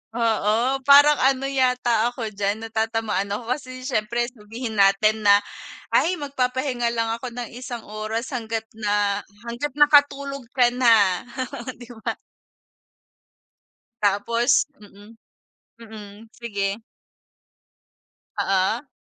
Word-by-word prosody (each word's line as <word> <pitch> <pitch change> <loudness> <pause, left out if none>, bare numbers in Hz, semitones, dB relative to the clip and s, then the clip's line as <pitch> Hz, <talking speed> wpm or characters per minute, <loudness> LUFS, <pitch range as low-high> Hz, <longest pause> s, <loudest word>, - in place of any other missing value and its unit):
Oo, 230 +3 +1
parang 290 +1 +7
ano 265 0 +2
yata 250 -4 +2
ako 240 -3 -5
diyan 205 +2 -2
natatamaan 225 -3 -1
ako, 225 +4 -4
kasi 255 -1 -5
syempre 240 -2 -1
sabihin 225 -1 -6
natin 200 +2 +4
na 200 - +8 0.6
ay 365 - +3
magpapahinga 260 -4 -2
lang 230 -1 0
ako 230 +3 -4
ng 245 -1 -6
isang 240 -1 -7
oras 215 +4 -5
hanggat 225 -3 -3
na 205 -2 0 0.3
hanggat 245 +4 -4
nakatulog 280 -3 +3
ka 245 -2 +4
na, 225 -6 +3 0.5
di 240 0 -13
ba? - - -2 1.8
Tapos 210 +5 +2
mm. 205 +2 -16 0.7
Mm, 215 -1 -12
sige. 205 -2 -4 1.5
Oo. 195 +8 0
230 Hz, 105 wpm, -23 LUFS, 215-255 Hz, 1.8 s, na